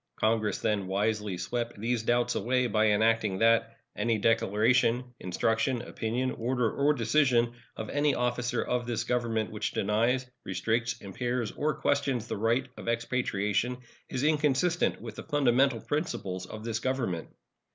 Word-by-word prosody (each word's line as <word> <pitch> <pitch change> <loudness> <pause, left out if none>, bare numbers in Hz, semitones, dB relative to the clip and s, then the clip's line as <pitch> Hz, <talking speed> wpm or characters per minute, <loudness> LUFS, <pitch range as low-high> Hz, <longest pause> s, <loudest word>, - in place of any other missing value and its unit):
Congress 110 -1 +1
then 100 -3 -1
wisely 105 0 -1
swept 120 +4 -3
these 115 +1 0
doubts 120 +2 +1
away 125 +1 +1
by 110 -2 +2
enacting 110 -1 +2
that 115 +2 +3 0.2
Any 115 -1 +1
declaration, 115 +3 +2
instruction, 115 +7 0
opinion, 125 +4 -2
order, 120 -1 0
or 145 +2 +2
decision 120 -1 +2 0.2
of 110 - -4
any 145 -1 +2
officer 120 0 0
of 125 -1 -1
this 120 -2 -1
Government 120 -3 -1
which 105 0 -3
denies, 115 +6 +1 0.2
restricts, 115 +4 -1
impairs, 120 +3 -2
or 155 +1 -1
questions 135 -5 0
the - - -4
right 115 +5 +1
of - - -9
expatriation 115 -1 0 0.3
is 130 - -2
inconsistent 155 +3 +2
with 115 -2 -8
the - - -6
fundamental 135 -4 +2
principles 100 - -3
of 110 +2 -8
this 115 -1 -2
Government. 120 -10 -2
115 Hz, 140 wpm, -29 LUFS, 110-125 Hz, 0.3 s, that